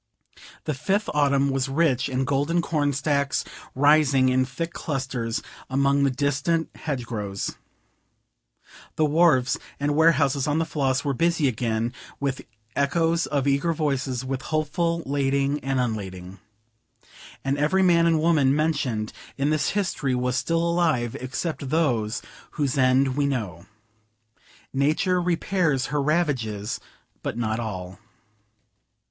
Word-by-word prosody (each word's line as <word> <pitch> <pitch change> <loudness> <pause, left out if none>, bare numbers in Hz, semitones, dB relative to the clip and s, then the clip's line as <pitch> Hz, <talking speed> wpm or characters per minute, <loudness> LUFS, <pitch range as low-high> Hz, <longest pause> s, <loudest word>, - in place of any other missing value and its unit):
The 155 - -2
fifth 190 +10 -1
autumn 140 -1 +2
was 135 0 -1
rich 135 -3 +1
in 130 0 -1
golden 145 +5 +1
cornstacks, 145 -2 0 0.3
rising 140 -2 +4
in 130 0 +2
thick 165 +6 -5
clusters 130 -5 -3 0.3
among 140 +1 +2
the - - +3
distant 140 +5 0
hedgerows; 115 -9 -4 1.4
the 155 - +2
wharves 150 -4 +3 0.2
and 145 +1 0
warehouses 145 -4 +3
on 150 +1 +1
the 165 - +1
Floss 135 -4 0
were 140 - +1
busy 165 +1 +2
again, 115 -1 -1 0.3
with 140 -2 -2 0.3
echoes 165 +4 +1
of 140 -1 0
eager 140 +5 +2
voices, 135 -5 -1
with 135 0 -3
hopeful 165 +2 -1
lading 140 +1 0
and 135 0 0
unlading. 95 -6 -4 1.1
And 135 +1 +1
every 190 +6 +3
man 170 -2 +4
and 165 -1 +3
woman 150 -4 +3
mentioned 130 -9 -1 0.2
in 140 +2 +1
this 155 -1 +1
history 150 -9 0
was 125 0 0
still 170 +3 0
living, 145 -11 0
except 140 +2 -4
those 125 -9 0 0.3
whose 145 -5 -1
end 130 0 +3
we 145 0 +1
know. 100 -10 -3 1.1
Nature 155 +7 +2
repairs 170 -5 +1
her 145 - +2
ravages, 130 -9 -1 0.4
but - - -4
not 110 -1 -1
all. 95 -5 -5
140 Hz, 125 wpm, -25 LUFS, 130-155 Hz, 1.4 s, rising